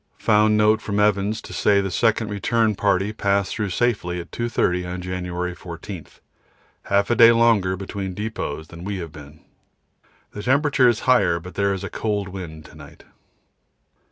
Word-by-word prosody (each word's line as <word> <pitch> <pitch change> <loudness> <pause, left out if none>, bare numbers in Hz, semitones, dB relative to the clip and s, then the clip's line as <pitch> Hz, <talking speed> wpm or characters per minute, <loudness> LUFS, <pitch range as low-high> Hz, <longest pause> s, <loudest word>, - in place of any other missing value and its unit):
Found 105 0 +3
note 110 +1 +3
from 100 -1 -2
Evans 105 +1 +1
to - - -10
say 100 -1 +3
the 95 -1 -2
second 110 +1 +1
return 110 +2 +1
party 100 0 0
passed 100 -2 0
through 105 -3 -2
safely 90 -4 -1
at 85 - -9
2.30 90 -7 -1
on - - -6
January 90 -1 -4
14 85 0 -9 0.8
half 100 +2 +1
a - - +3
day 115 0 +8
longer 115 -5 +3
between 95 -1 -5
depots 90 -8 -5
than 85 +1 -10
we 100 +1 -3
have 85 -4 -6
been. 75 0 -13 0.9
The 105 - -7
temperature 135 +1 +3
is 115 -2 0
higher, 100 -10 +3
but 90 +2 -11
there 100 0 +1
is 95 - -7
a - - -4
cold 105 -3 -2
wind 85 -5 -8
to - - -15
night. 75 -2 -14
100 Hz, 170 wpm, -22 LUFS, 90-110 Hz, 0.9 s, day